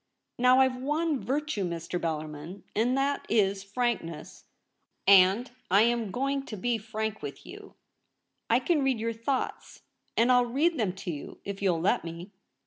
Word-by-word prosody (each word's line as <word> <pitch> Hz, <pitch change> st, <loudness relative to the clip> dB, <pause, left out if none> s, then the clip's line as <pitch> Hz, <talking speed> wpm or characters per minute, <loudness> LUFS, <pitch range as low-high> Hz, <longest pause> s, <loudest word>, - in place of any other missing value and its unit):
Now 250 Hz, +1 st, +6 dB
I've 260 Hz, -1 st, +2 dB
one 295 Hz, +3 st, 0 dB
virtue, 285 Hz, -5 st, -2 dB
Mr. 170 Hz, 0 st, -3 dB
Bellarmin, 155 Hz, +2 st, -5 dB
and 245 Hz, +5 st, +2 dB
that 280 Hz, +1 st, 0 dB
is 195 Hz, -3 st, +2 dB
frank 235 Hz, +2 st, 0 dB
ness; 165 Hz, -2 st, -10 dB, 0.6 s
and 195 Hz, +5 st, +6 dB, 0.2 s
I 200 Hz, +4 st, +6 dB
am 235 Hz, -2 st, +1 dB
going 275 Hz, +6 st, -1 dB
to 215 Hz, -, -6 dB
be 235 Hz, +4 st, 0 dB
frank 220 Hz, 0 st, -4 dB
with -, -, -7 dB
you. -, -, -11 dB, 0.7 s
I 235 Hz, +3 st, +4 dB
can 310 Hz, +2 st, +2 dB
read 265 Hz, -4 st, +1 dB
your 230 Hz, +1 st, -1 dB
thoughts, 240 Hz, +4 st, -3 dB, 0.3 s
and 235 Hz, +3 st, +4 dB
I'll 245 Hz, -1 st, +4 dB
read 300 Hz, +6 st, +1 dB
them 200 Hz, -5 st, 0 dB
to 190 Hz, -1 st, -5 dB
you, 145 Hz, -3 st, -8 dB
if 200 Hz, 0 st, -5 dB
you'll 180 Hz, -4 st, +2 dB
let 185 Hz, -, +2 dB
me.' 170 Hz, +3 st, -8 dB
225 Hz, 165 wpm, -28 LUFS, 190-255 Hz, 0.7 s, Now